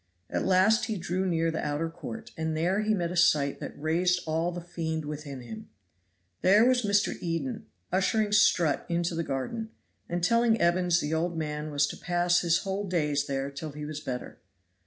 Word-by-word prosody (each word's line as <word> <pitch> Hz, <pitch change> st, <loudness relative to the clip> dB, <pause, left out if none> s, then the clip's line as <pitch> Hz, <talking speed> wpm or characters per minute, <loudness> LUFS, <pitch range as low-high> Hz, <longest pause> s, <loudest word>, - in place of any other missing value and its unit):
At -, -, -1 dB
last 190 Hz, +5 st, +4 dB
he 220 Hz, -3 st, -3 dB
drew 185 Hz, +2 st, -1 dB
near 165 Hz, -2 st, +1 dB
the 160 Hz, -, -3 dB
outer 150 Hz, +2 st, -1 dB
court, 225 Hz, +8 st, -8 dB
and 160 Hz, -1 st, -2 dB
there 180 Hz, +6 st, +1 dB
he 215 Hz, 0 st, +1 dB
met 175 Hz, -3 st, -2 dB
a -, -, -4 dB
sight 150 Hz, -5 st, +3 dB
that -, -, -7 dB
raised 175 Hz, +4 st, +1 dB
all 165 Hz, +2 st, 0 dB
the 175 Hz, -, -5 dB
fiend 165 Hz, -2 st, -4 dB
within 145 Hz, -3 st, -6 dB
him. 220 Hz, -, -9 dB, 0.7 s
There 205 Hz, +5 st, +6 dB
was 255 Hz, 0 st, +4 dB
Mr. 200 Hz, -2 st, +2 dB
Eden 215 Hz, +7 st, -3 dB, 0.2 s
ushering 205 Hz, +3 st, +1 dB
Strutt 200 Hz, -7 st, +3 dB
into 170 Hz, 0 st, 0 dB
the 165 Hz, 0 st, -1 dB
garden, 165 Hz, -, -3 dB, 0.4 s
and 175 Hz, 0 st, -2 dB
telling 230 Hz, +3 st, +3 dB
Evans 175 Hz, 0 st, +3 dB
the 150 Hz, +2 st, -2 dB
old 165 Hz, +1 st, -1 dB
man 150 Hz, -1 st, -3 dB
was 145 Hz, -1 st, +2 dB
to -, -, -6 dB
pass 175 Hz, +1 st, +2 dB
his 170 Hz, -1 st, +2 dB
whole 195 Hz, +1 st, -3 dB
days 150 Hz, -5 st, 0 dB
there 135 Hz, 0 st, -2 dB
till 145 Hz, +1 st, -7 dB
he 150 Hz, 0 st, -6 dB
was 150 Hz, 0 st, -5 dB
better. 125 Hz, -4 st, -6 dB
170 Hz, 190 wpm, -28 LUFS, 155-195 Hz, 0.7 s, There